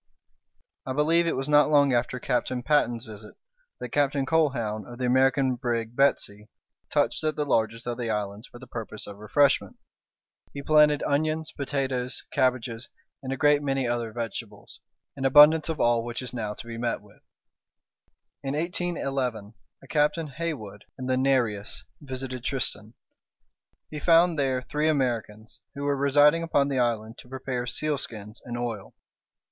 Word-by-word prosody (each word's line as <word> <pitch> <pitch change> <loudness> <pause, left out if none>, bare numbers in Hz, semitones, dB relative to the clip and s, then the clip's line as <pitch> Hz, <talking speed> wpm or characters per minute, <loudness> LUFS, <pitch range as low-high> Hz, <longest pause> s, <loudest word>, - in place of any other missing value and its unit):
I 130 - -4
believe 165 +4 +2
it - - 0
was 135 +1 -2
not 150 -1 +5
long 145 -3 +4
after 120 +1 0
Captain 125 0 -1
Patten's 120 -5 +1
visit 105 -1 -11 0.4
that - - -6
Captain 140 -1 +1
Colquhoun, 130 -9 0
of 120 - -9
the 125 - -2
American 130 +1 +3
brig 120 -2 -2
Betsey, 105 -6 +1 0.4
touched - - +1
at 155 -1 0
the 150 - -1
largest 115 -3 0
of 120 0 -4
the 120 -2 -2
islands 105 0 -3
for - - -13
the 130 - -11
purpose 115 -3 -6
of 100 - -9
refreshment. 140 +7 +2 0.8
He 140 - -5
planted 150 -1 +4
onions, 155 +2 0
potatoes, 135 -3 -2
cabbages, 125 -2 0 0.3
and 130 -1 -5
a 135 - -2
great 145 +1 +4
many 135 -3 -1
other 120 -2 -2
vegetables, 115 -1 -7 0.4
an 135 - -6
abundance 150 +4 +7
of 160 - -3
all 120 -1 +3
which 120 +2 -5
is 125 - -6
now 105 -4 -3
to - - -10
be 115 0 -7
met 120 -1 -1
with. 105 - -20 1.2
In 135 0 -3
1811, 135 - -2 0.3
a - - -14
Captain 150 +2 +1
Haywood, 135 -10 -5
in 130 - -6
the 130 0 +1
Nereus, 125 -6 0 0.2
visited 130 -3 -5
Tristan. 120 -4 -2 1.0
He 150 - -5
found 165 0 +4
there 130 -2 0
three 150 +3 -1
Americans, 115 -7 -2 0.2
who 140 - -5
were 145 0 +1
residing 145 +3 +4
upon 145 -4 +1
the 135 -2 0
island 115 -2 -1
to 125 - -14
prepare 130 -1 -4
sealskins 120 -8 -4
and 120 -1 -5
oil. 115 -5 -5
130 Hz, 160 wpm, -26 LUFS, 115-145 Hz, 1.2 s, abundance